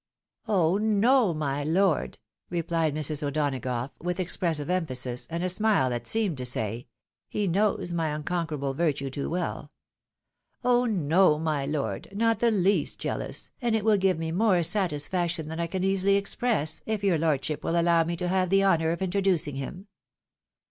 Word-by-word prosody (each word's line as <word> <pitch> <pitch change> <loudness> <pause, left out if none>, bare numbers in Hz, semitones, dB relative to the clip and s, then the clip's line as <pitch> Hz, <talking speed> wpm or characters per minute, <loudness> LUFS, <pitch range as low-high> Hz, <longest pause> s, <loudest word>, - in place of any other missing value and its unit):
" - - -65
"Oh 185 -2 +2
no, 220 +1 +3
my 145 -3 -2
lord!" 160 - +1 0.3
replied 165 -3 -1
Mrs. 155 0 -1
O'Donagough, 135 -4 -2
with 175 +2 -3
expressive 165 -4 -1
emphasis, 130 -9 -1
and 170 +1 -3
a - - +1
smile 185 - +3
that 120 -1 -4
seemed 210 -9 0
to 130 - -4
say, 115 -1 -1 0.2
" - - -68
He 210 - -1
knows 190 -1 0
my 165 -2 0
unconquerable 150 -2 -3
virtue 140 -3 -1
too 140 +1 -4
well," 175 +1 -3 0.5
" - - -49
oh 245 0 +3
no! 175 -4 +3
my 150 -3 -1
lord, 140 -10 -3
not 230 +1 +2
the 235 - +3
least 200 -2 +1
jealous, - - -3
and 235 -2 +1
it 220 -1 -1
will 215 -2 +4
give 190 -3 +2
me 160 0 -3
more 185 -1 +2
satisfaction 170 -2 0
than 160 +1 -5
I 170 - -1
can 185 +2 -3
easily 195 +1 +3
express, 200 -5 0
if 215 -2 -2
your 185 -5 +2
lordship 150 -1 -1
will 170 +1 +1
allow 170 -1 +3
me 170 +1 -3
to 180 +1 -3
have 185 0 +1
the 195 +1 +3
honour 165 -4 +3
of 170 +3 -2
introducing 185 -6 0
him." 180 +8 -6
170 Hz, 175 wpm, -27 LUFS, 150-195 Hz, 0.5 s, will